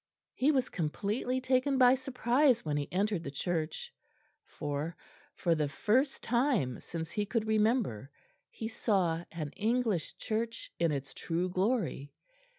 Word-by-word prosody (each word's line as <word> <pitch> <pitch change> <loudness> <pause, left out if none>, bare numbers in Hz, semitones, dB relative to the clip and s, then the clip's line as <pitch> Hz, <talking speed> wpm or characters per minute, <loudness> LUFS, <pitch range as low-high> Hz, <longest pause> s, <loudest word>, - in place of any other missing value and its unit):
He 270 - +2
was 260 -4 +2
completely 205 +10 -1
taken 260 +2 +2
by 250 -1 +7
surprise 260 - +2
when 150 -1 0
he 145 -1 -2
entered 195 -1 0
the 140 - -4
church, 170 - -3 0.5
for, 150 +2 -4 0.4
for 170 - +2
the 155 -2 +1
first 245 - +1
time 235 - +1
since 165 -1 -6
he 210 - 0
could 225 0 0
remember, 215 - +1 0.4
he 220 - -5
saw 185 -7 +1
an 155 -4 -4
English 220 -4 0
church 230 +1 -3
in 170 -2 +3
its 140 -2 -4
true 175 +2 -1
glory. 185 - -1
210 Hz, 140 wpm, -32 LUFS, 165-250 Hz, 0.5 s, by